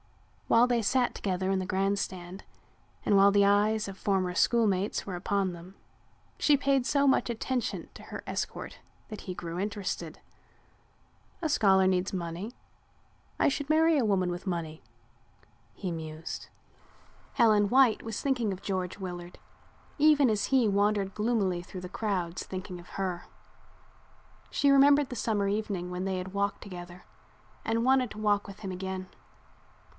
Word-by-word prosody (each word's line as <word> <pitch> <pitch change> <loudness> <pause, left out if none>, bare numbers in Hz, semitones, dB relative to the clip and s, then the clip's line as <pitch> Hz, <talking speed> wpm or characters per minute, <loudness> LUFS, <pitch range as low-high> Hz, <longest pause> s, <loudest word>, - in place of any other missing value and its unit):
While 230 +1 +5
they 240 -2 +1
sat 245 +3 +1
together 190 -1 -1
in 190 - +1
the 185 - -3
grand 195 +2 0
stand 185 0 -6 0.6
and 205 - +3
while 200 +1 +7
the 200 0 +4
eyes 210 +2 +3
of 195 -1 -8
former 190 -3 0
schoolmates 205 -2 +1
were 190 - -4
upon 190 +1 -1
them, 175 +3 -12 0.6
she 295 -2 +4
paid 275 -2 +1
so 280 +1 +2
much 265 - +3
attention 240 +1 -2
to - - -12
her - - -8
escort - - -4 0.3
that 215 -2 -8
he 185 - -6
grew 170 0 -5
interested. 195 -5 -4 1.2
"A 325 - 0
scholar 195 -10 +4
needs 185 0 +1
money. 175 +4 -4 0.9
I - - +4
should 285 +1 -1
marry 320 +1 +4
a 270 - +2
woman 190 -4 +1
with 175 +3 -6
money," 165 -3 -3 0.9
he 190 - -5
mused. 160 -1 -6 0.8
Helen 210 -3 +4
White 255 -2 +4
was 225 -2 -5
thinking 250 -6 0
of 190 0 -7
George 185 -2 -3
Willard 175 -2 -7 0.6
even 295 -3 +5
as 210 -1 0
he 260 -4 +3
wandered 200 -1 +1
gloomily 210 -5 0
through 180 +1 -9
the 180 - -6
crowds 185 -5 -2
thinking 185 -1 -7
of 175 - -14
her. 180 -2 -2 1.2
She 280 - +3
remembered 280 0 +5
the 250 - -5
summer 210 -3 0
evening 200 -3 -2
when 180 +1 -3
they 190 -1 -1
had 185 +1 -6
walked 200 0 -1
together 175 -2 -9 0.6
and 230 +1 0
wanted 260 -2 +3
to 215 - -9
walk 205 -1 +1
with 200 0 -11
him 195 -3 -4
again. 185 0 -5
200 Hz, 155 wpm, -29 LUFS, 185-225 Hz, 1.2 s, while